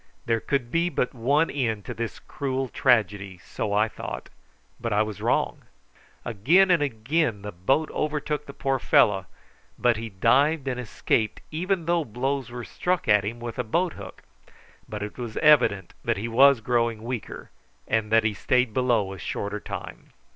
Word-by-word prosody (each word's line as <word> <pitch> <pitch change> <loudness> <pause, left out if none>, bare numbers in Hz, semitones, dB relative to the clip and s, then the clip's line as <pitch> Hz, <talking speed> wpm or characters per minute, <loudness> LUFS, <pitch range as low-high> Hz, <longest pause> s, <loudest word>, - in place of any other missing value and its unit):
There 115 -1 +1
could 125 -1 -2
be 170 +3 +2
but 125 - -1
one 140 +7 +2
end 115 -7 -2
to - - -5
this 115 -1 -4
cruel 135 -2 -3
tragedy, 100 -7 +1
so 105 - -3
I 105 +2 +3
thought; - - -7 0.5
but 115 -1 -3
I 105 +1 +3
was 105 -3 -7
wrong. - - 0 0.6
Again 165 - +4
and 170 -4 +4
again 130 -3 0
the 105 - -5
boat 135 - 0
overtook 150 -1 -2
the 140 - -8
poor 135 -1 -1
fellow, 95 -5 +3 0.5
but 120 -2 +2
he 115 +1 -5
dived 135 +9 +2
and 125 -1 -2
escaped 110 -2 -1
even 175 +2 -1
though 170 0 +2
blows 130 +2 -2
were 120 0 -6
struck 180 -4 -1
at 105 -2 +5
him 115 +4 -4
with 120 +1 -6
a - - +1
boat 170 +10 0
hook; 100 -2 -11 0.7
but 105 -1 -4
it 105 +4 -7
was 120 -3 -5
evident 125 - +4
that - - 0
he 110 +4 -3
was 130 +2 +5
growing 115 -1 0
weaker, 120 -1 -6 0.4
and 110 -1 0
that 115 0 +5
he 110 -1 +1
stayed 125 +2 +1
below 115 -6 +1
a 95 - -10
shorter 100 +5 -4
time. - - -8
120 Hz, 175 wpm, -25 LUFS, 105-140 Hz, 0.7 s, at